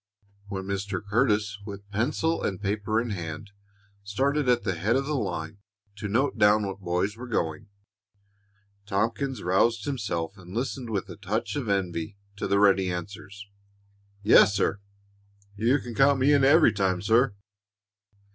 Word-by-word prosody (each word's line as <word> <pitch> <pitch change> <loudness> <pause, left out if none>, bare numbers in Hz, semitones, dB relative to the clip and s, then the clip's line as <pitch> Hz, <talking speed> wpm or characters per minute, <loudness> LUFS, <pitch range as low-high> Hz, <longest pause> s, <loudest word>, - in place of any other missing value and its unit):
When 95 -2 -4
Mr. 100 0 -3
Curtis, 105 -2 +1
with 100 -1 -9
pencil 150 +10 0
and 95 - -2
paper 105 +2 -1
in 120 -1 -3
hand, 85 +1 -6 0.5
started 135 +7 0
at 120 -2 +3
the 95 -2 -1
head 100 +8 0
of 135 +1 0
the 150 - -2
line 80 - -3 0.4
to 105 - -4
note 125 +8 0
down 105 +1 +5
what 95 0 -5
boys 90 +3 -1
were 125 +2 -8
going, 85 -4 -2 1.2
Tompkins 115 +6 -1
roused 105 +5 +2
himself 100 - -3
and 90 +1 -11
listened 125 0 -3
with 100 -3 -2
a 90 - -10
touch 105 +6 -3
of 135 -7 -3
envy 95 -1 -2 0.2
to - - -2
the 100 - +2
ready 95 -2 +4
answers: 100 +3 -7 0.8
"Yes, 105 -1 +6
sir!" 100 0 0 0.8
"You 115 +7 +2
can 120 -3 -7
count 135 +3 +4
me 140 +3 +4
in 140 -2 +4
every 145 -1 +6
time, 95 -3 0
sir!" 115 +1 +3
105 Hz, 155 wpm, -26 LUFS, 95-120 Hz, 1.2 s, Yes